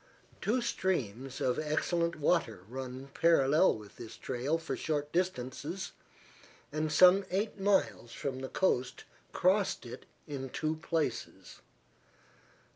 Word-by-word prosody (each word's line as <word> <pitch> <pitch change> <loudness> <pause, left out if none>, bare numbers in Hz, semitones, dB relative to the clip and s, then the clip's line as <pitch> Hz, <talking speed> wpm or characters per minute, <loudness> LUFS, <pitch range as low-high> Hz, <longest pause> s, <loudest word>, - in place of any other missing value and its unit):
Two 245 +4 +1
streams 135 - -2
of 125 - +1
excellent 170 +2 0
water 145 - +1
run 130 +2 -6
parallel 160 -2 +4
with 105 -1 -13
this 115 -1 -9
trail 130 +7 -1
for 165 - -4
short 150 -2 -2
distances, 170 +1 -2 0.8
and 155 +1 -1
some 185 +4 +7
eight 205 +3 -1
miles 195 -11 +1
from 130 -2 -4
the 130 0 -5
coast 130 -9 0 0.3
crossed - - +2
it - - -9 0.2
in 135 -2 -5
two 155 +4 -2
places. 160 0 -3
150 Hz, 120 wpm, -32 LUFS, 130-175 Hz, 0.8 s, some